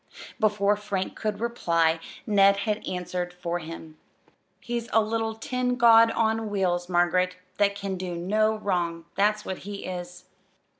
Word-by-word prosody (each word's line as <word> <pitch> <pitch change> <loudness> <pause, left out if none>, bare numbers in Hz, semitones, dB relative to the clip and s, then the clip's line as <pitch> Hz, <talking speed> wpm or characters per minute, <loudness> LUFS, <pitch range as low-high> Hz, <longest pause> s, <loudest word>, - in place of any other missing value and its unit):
Before 205 -1 +2
Frank 205 -2 -3
could 215 -2 -3
reply 170 -9 +1 0.3
Ned 200 -2 +5
had 215 -1 -1
answered 180 0 -3
for 175 0 -3
him. 160 -1 -9 0.6
"He's 235 -1 -4
a 225 - +5
little 225 0 -1
tin 250 +2 -1
god 230 -1 +7
on 225 -1 0
wheels, 180 -3 0
Margaret, 180 +1 +2 0.2
that 200 -1 +3
can 200 -2 -4
do 180 -1 -4
no 215 +5 +1
wrong. 175 -5 -2
That's 210 +2 +1
what 190 - -4
he 200 +1 -7
is." 180 -1 -7
200 Hz, 145 wpm, -26 LUFS, 175-220 Hz, 0.6 s, god